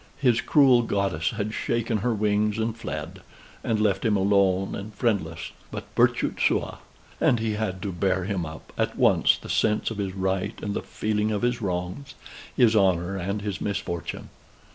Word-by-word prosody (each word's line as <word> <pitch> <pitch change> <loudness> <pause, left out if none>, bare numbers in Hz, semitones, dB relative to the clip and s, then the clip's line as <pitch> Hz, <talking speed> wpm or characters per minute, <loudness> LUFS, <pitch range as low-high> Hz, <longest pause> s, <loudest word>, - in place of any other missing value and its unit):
His 125 -4 +3
cruel 135 -5 +5
goddess 100 -8 0
had 110 -1 -3
shaken 115 -1 -1
her 120 +5 0
wings 105 0 +1
and 110 0 -1
fled: 115 - -6 0.4
and 110 -2 0
left 105 -3 +1
him 110 -3 +2
alone 95 -1 +2
and 100 +2 -6
friendless, 95 -9 -1 0.2
but - - -6
virtute - - +2
sua. - - +1 0.4
And 120 - +3
he 110 -1 -1
had 100 -4 -3
to 100 - -2
bear 95 +1 0
him 95 -2 -2
up, 80 0 -9
at - - 0
once - - +4
the - - -11
sense 105 +1 +1
of 110 - -5
his 95 -2 -3
right 95 +2 -1
and 105 - -2
the - - -2
feeling 105 0 -1
of 105 +1 -2
his 120 -1 0
wrongs, 90 +8 -4 0.4
his 115 -3 +5
honor 95 -2 +2
and 100 +3 -3
his 100 -3 -4
misfortune. 85 -4 -4
105 Hz, 175 wpm, -25 LUFS, 95-110 Hz, 0.4 s, cruel